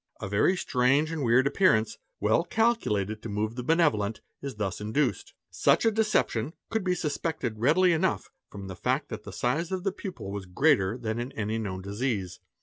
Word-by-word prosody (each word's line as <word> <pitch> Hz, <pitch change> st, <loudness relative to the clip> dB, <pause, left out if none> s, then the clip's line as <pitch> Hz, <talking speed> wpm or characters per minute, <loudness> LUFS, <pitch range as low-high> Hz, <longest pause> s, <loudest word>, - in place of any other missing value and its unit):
A -, -, -4 dB
very 105 Hz, -, +2 dB
strange 135 Hz, +3 st, +2 dB
and 160 Hz, -3 st, -3 dB
weird 120 Hz, +2 st, +4 dB
appearance, 140 Hz, -, +2 dB, 0.2 s
well 110 Hz, +10 st, +2 dB
calculated 110 Hz, -, 0 dB
to 115 Hz, -, -6 dB
move 105 Hz, +2 st, -2 dB
the 125 Hz, -, -3 dB
benevolent, 125 Hz, -8 st, +2 dB, 0.2 s
is 140 Hz, -3 st, -5 dB
thus 100 Hz, -2 st, -3 dB
induced. 120 Hz, +6 st, 0 dB
_ -, -, -18 dB, 0.2 s
Such 140 Hz, -, +3 dB
a 225 Hz, -, +5 dB
deception 205 Hz, -, +1 dB, 0.2 s
could 220 Hz, -3 st, 0 dB
be 180 Hz, -1 st, +1 dB
suspected 150 Hz, -8 st, -3 dB
readily 170 Hz, +9 st, +4 dB
enough 170 Hz, +4 st, 0 dB, 0.2 s
from 100 Hz, -1 st, -8 dB
the 95 Hz, -, -7 dB
fact -, -, -1 dB
that -, -, -6 dB
_ -, -, -32 dB
the -, -, -7 dB
size 155 Hz, +9 st, -1 dB
of 185 Hz, -1 st, -2 dB
the 195 Hz, -, +1 dB
pupil 185 Hz, -, -7 dB
was 100 Hz, -2 st, -5 dB
greater 110 Hz, -, +2 dB
than 115 Hz, -2 st, -3 dB
in 120 Hz, +3 st, -4 dB
any 110 Hz, +1 st, -2 dB
known 95 Hz, -4 st, -4 dB
disease. 100 Hz, -2 st, -3 dB
125 Hz, 195 wpm, -28 LUFS, 105-165 Hz, 0.2 s, a